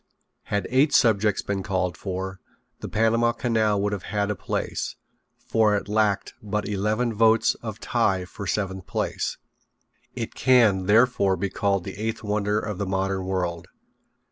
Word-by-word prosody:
Had 100 -1 -1
eight 140 +3 +4
subjects 105 -4 +3
been 100 -1 -2
called 95 -2 -1
for 95 -1 -5 0.4
the - - -6
Panama 115 +2 +2
Canal 110 -4 +1
would 105 0 0
have 100 - -3
had 105 0 0
a - - -2
place, 95 - -3 0.5
for 110 -2 +3
it 100 - -3
lacked 105 -1 +1
but 105 0 -2
eleven 105 +4 0
votes 110 +1 +4
of - - -6
tie 95 -1 +1
for 100 +2 -8
seventh 95 0 -2
place. - - -2 0.8
It 115 -3 -4
can, 110 -8 +4
therefore, 105 -3 +4
be 95 +2 -2
called 100 -3 0
the 95 - -7
eighth 110 +2 -3
wonder 105 0 0
of 105 -3 -5
the 100 - -2
modern 95 0 -1
world. 90 -3 -2
105 Hz, 155 wpm, -25 LUFS, 95-110 Hz, 0.8 s, eight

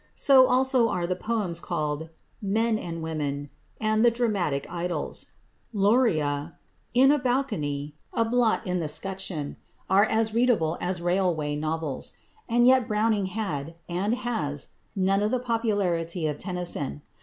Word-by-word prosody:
So 265 -3 +6
also 255 -2 +3
are 180 -4 -1
the 180 +1 -1
poems 200 -4 -1
called 150 0 -3 0.3
"Men 220 +2 +1
and 165 -3 -5
Women," 145 -3 -3 0.3
and 215 0 +2
the 240 - +7
"Dramatic 200 - 0
Idyls." 175 -2 -4 0.5
"Luria," 170 - +2 0.4
"In 265 +3 +7
a 295 - +3
Balcony," 205 - -1 0.2
"A 230 - +1
Blot 230 -1 +2
in 180 -1 -1
the 160 - -2
'Scutcheon," 180 -2 -3 0.3
are 200 +2 +6
as 220 0 0
readable 225 -9 +2
as 180 -1 -2
railway 175 -5 +1
novels. 155 -1 -3 0.4
And 240 +1 +4
yet 255 -1 +5
Browning 210 -2 +1
had, 165 -7 -4
and 190 +6 0
has, 170 - -3 0.3
none 195 +1 +2
of 210 - +1
the 255 - +1
popularity 200 -9 0
of 150 -1 -2
Tennyson. 175 -6 -3
190 Hz, 140 wpm, -26 LUFS, 160-230 Hz, 0.5 s, the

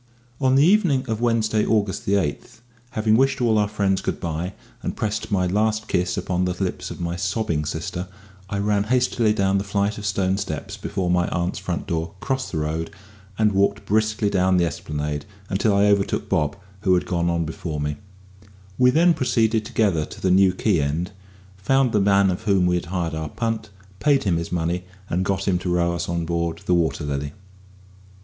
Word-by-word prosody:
On 130 -1 +3
the 140 +2 +6
evening 170 -9 +3
of 110 0 -2
Wednesday, 110 -2 +2
August 105 -3 0
8th, 100 -1 +3
18, 75 - -5 0.5
having 110 -1 +2
wished 135 +2 +2
all 115 -3 +3
our 105 - +2
friends 100 -2 0
good - - -3
bye, 85 +3 -3 0.3
and - - -3
pressed 110 0 -2
my 95 -2 +2
last 110 +3 0
kiss 90 -1 0
upon 90 -1 0
the 90 - 0
lips 95 -2 -2
of - - -8
my 85 0 -2
sobbing 85 -3 -1
sister, 85 +4 -4 0.4
I 100 - -2
ran 100 0 +1
hastily 120 -2 +2
down 100 -2 +2
the - - -2
flight 100 +1 -1
of 100 - -4
stone 95 -1 +1
steps 100 +1 -4
before 95 -3 -2
my 90 0 +2
aunt's 85 +1 -2
front 85 -2 -3
door, 85 -1 -3
crossed 130 +2 -2
the 80 - -3
road, 80 +2 -2 0.5
and 110 -1 +3
walked 100 0 +1
briskly 110 0 +1
down 95 -1 +3
the 85 - +3
Esplanade 75 -2 -4 0.3
until 100 +2 +2
I 100 +1 +4
overtook 100 -1 +1
Bob, 75 +4 0 0.2
who 95 -2 +3
had 90 - 0
gone 85 -1 0
on 85 -1 0
before 80 -1 -5
me; 75 0 -2 0.8
we 125 0 +6
then 170 +6 +5
proceeded 115 -5 +1
together 95 -8 +1
to - - -9
the 95 - +1
New 95 0 +5
Quay 95 -5 +2
end, 80 +7 -2 0.5
found 135 +5 +2
the 105 - +2
man 100 -1 +4
of 90 - -5
whom 100 -4 +3
we 90 - +2
had 90 -1 -1
hired 85 -2 -2
our 80 -1 -3
punt, 115 -2 -3 0.3
paid 145 +2 +3
him 90 -5 +1
his 85 - -4
money, 90 +1 -1 0.3
and 90 +2 +1
got 95 0 -1
him 90 -2 +2
to 90 0 -2
row 85 0 +2
us 85 - -3
on 85 -1 -1
board 85 0 -2
the 90 - +2
Water 85 -2 +1
Lily. 70 0 -3
95 Hz, 200 wpm, -23 LUFS, 85-110 Hz, 0.8 s, the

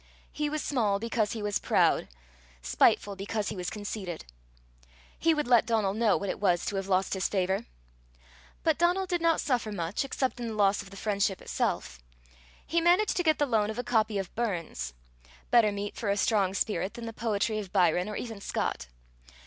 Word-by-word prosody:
He 300 0 -2
was 305 0 -2
small 220 -8 +1
because 225 0 -1
he 220 -2 -5
was 205 -1 0
proud, - - +2 0.6
spiteful 200 - +3
because 205 +2 -3
he - - -5
was 180 -2 -3
conceited. 205 -4 -5 0.9
He 330 - +2
would 300 -4 -1
let 240 -2 +5
Donal 215 -4 +1
know 220 -1 +3
what 200 - -4
it - - -7
was 180 -4 +2
to 205 - -2
have 195 0 -3
lost 190 0 +1
his 190 -1 0
favour! 190 -1 0 1.0
But 320 -1 +2
Donal 355 +3 +3
did 355 -2 -1
not 330 -1 +3
suffer 245 -5 0
much, 175 +2 -2
except 260 -2 -2
in 240 - -3
the 220 - -4
loss 200 -1 +3
of 195 - -12
the 195 - -11
friendship 200 -2 0
itself. 65 0 -2 0.7
He 335 0 +1
managed 355 +5 +3
to - - +1
get 315 -3 +3
the 290 - +2
loan 220 -5 +1
of 220 - -5
a 245 - -2
copy 220 -3 +1
of 195 -2 -4
Burns 165 - -3 0.6
better 230 -3 +5
meat 205 0 -4
for 215 - -3
a 200 - +1
strong 200 -3 +2
spirit 205 -1 -1
than 235 - -7
the 225 - -6
poetry 215 -1 -1
of 195 -4 -7
Byron 180 +2 +2
or 210 - -5
even 225 -4 -6
Scott. 60 - -2
210 Hz, 195 wpm, -29 LUFS, 195-240 Hz, 1.0 s, let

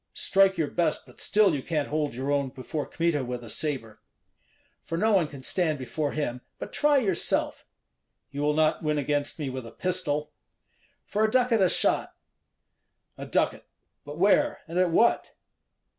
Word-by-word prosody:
Strike 195 -1 +3
your 160 -3 +1
best, 170 -3 0
but - - -13
still 210 -4 +3
you 140 - -2
can't 150 0 -2
hold 150 -4 -1
your 135 +3 -2
own 140 -2 +1
before 135 +3 -5
Kmita 165 -4 0
with 125 -1 -5
a 115 - -8
sabre." 130 -6 -3 0.8
"For 165 - -4
no 220 +5 +2
one 185 -6 +3
can 140 -3 -11
stand 160 0 0
before 140 +3 -3
him; 125 -5 -3 0.2
but - - -8
try 295 -1 +3
yourself." 195 -9 -1 0.6
"You 145 0 -4
will 150 0 +1
not 155 0 +2
win 150 -2 0
against 145 0 -1
me 145 -4 -3
with 130 -2 -6
a - - -10
pistol." 150 -5 -1 0.7
"For 210 - 0
a 220 - +3
ducat 245 -2 +3
a 185 - +5
shot." - - +1 1.0
"A - - -8
ducat! - - 0 0.4
But 145 +1 -9
where 205 - +3
and 170 +2 -2
at 185 -1 +3
what?" 230 +8 +2
155 Hz, 175 wpm, -27 LUFS, 140-185 Hz, 1.0 s, a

